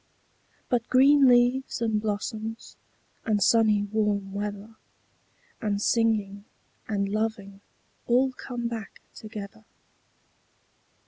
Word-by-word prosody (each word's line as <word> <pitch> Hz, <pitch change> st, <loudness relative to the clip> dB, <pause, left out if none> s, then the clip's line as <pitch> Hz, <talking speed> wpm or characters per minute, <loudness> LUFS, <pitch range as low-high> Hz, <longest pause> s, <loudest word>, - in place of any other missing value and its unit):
But 240 Hz, -3 st, -1 dB
green 275 Hz, +2 st, +6 dB
leaves, 245 Hz, +2 st, +3 dB
and 220 Hz, -2 st, 0 dB
blossoms, 220 Hz, +1 st, -4 dB, 0.5 s
and 215 Hz, -2 st, +1 dB
sunny 215 Hz, 0 st, +3 dB
warm 205 Hz, -2 st, -1 dB
weather, 205 Hz, +2 st, -5 dB, 0.8 s
5 215 Hz, -, -2 dB
And 200 Hz, -, -1 dB
singing, 210 Hz, -3 st, 0 dB, 0.4 s
and 200 Hz, -2 st, -1 dB
loving 205 Hz, -2 st, -3 dB, 0.5 s
all 255 Hz, +2 st, +3 dB
come 245 Hz, -2 st, -5 dB
back 225 Hz, -3 st, -7 dB
together. 215 Hz, 0 st, -9 dB
220 Hz, 100 wpm, -26 LUFS, 205-235 Hz, 0.8 s, green